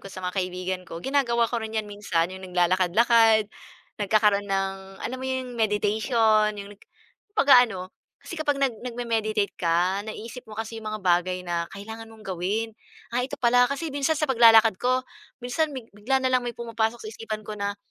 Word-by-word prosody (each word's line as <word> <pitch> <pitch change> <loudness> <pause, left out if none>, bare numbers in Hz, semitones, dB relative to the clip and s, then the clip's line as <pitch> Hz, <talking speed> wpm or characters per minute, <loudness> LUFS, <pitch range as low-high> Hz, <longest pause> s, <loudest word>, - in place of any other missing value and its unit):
ko 195 - -10
sa - - -7
mga 180 - -3
kaibigan 185 0 -3
ko, 165 - -7
ginagawa 240 -4 +2
ko 240 - -2
rin 220 0 -6
'yan 215 -1 -1
minsan. 190 -5 -1
Yung 190 0 -9
naglalakad-lakad 205 +5 +3 0.5
nagkakaroon 205 0 +3
ng, 195 0 -3
alam 255 - -4
mo,' 260 - -5
yung 255 -2 -3
meditation, 215 0 +2
yung 200 +1 -8
nag - - -27 0.5
pag-aano 245 - +5 0.4
kasi - - -7
kapag 290 -2 +1
nag 260 -5 0
nagme-meditate 225 -4 -1
ka, 175 +3 +1
naisip 230 +3 -8
mo 215 - -9
kasi 225 0 -5
yung 215 - -6
mga 215 - -5
bagay 180 +1 +2
na 170 -1 -2
kailangan 220 +3 -8
mong 220 -2 -15
gawin, 195 +5 -2 0.4
ah, 245 - +2
ito 260 - -5
pala 245 0 +4
kasi 300 +4 -3
minsan 285 +3 0
sa 305 - +1
paglalakad 225 -4 +6
ko, 255 +1 +1 0.4
minsan 305 +6 0
big 235 -3 -8
bigla 245 +6 0
na 255 - +2
lang 255 - +4
may 240 -1 -5
pumapasok 230 0 -2
sa 215 - -5
isipan 215 -1 -6
ko 215 - -5
na, 200 0 -2
220 Hz, 185 wpm, -25 LUFS, 195-240 Hz, 0.5 s, paglalakad